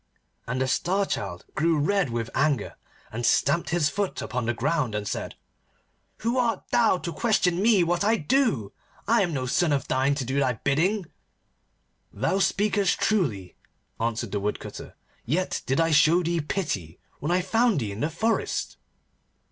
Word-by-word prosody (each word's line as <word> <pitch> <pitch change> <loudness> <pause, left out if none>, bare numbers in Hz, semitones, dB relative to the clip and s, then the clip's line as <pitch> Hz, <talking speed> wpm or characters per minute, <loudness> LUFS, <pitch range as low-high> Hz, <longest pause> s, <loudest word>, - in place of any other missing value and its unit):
And 125 +2 -2
the 130 - +1
Star 190 +9 +1
Child 95 - -4
grew 165 +2 +2
red 195 +2 +1
with 115 -1 -3
anger, 140 -5 0 0.4
and 120 +2 -4
stamped 145 +7 +2
his 165 -3 +2
foot 200 +4 -2
upon 125 -2 -3
the 120 - +1
ground, 135 -3 0
and 105 -1 -3
said, - - -4 0.9
'Who 235 +3 0
art 235 -2 0
thou 225 -5 +4
to 170 -1 -5
question 190 -6 +1
me 210 -4 +4
what 175 +2 0
I 220 +2 +3
do? 150 - +1 0.3
I 230 +1 +4
am 180 -3 0
no 130 -4 -2
son 155 +6 +1
of 140 -1 0
thine 135 +2 +1
to 135 -3 -3
do 135 +3 -1
thy 130 -3 +2
bidding.' 170 - 0 1.1
'Thou 135 - 0
speakest 200 0 +1
truly,' 120 - 0 0.4
answered 115 -1 -2
the 105 - -1
Woodcutter, 105 +1 -5 0.3
'yet 180 +7 -1
did 135 +3 +1
I 165 0 +2
show 160 +4 +5
thee 170 0 0
pity 125 - -3 0.2
when 150 - -3
I 180 +1 +3
found 225 -1 +2
thee 110 -5 -3
in 100 - -7
the 150 - 0
forest. 220 +8 -1
155 Hz, 170 wpm, -26 LUFS, 125-195 Hz, 1.1 s, show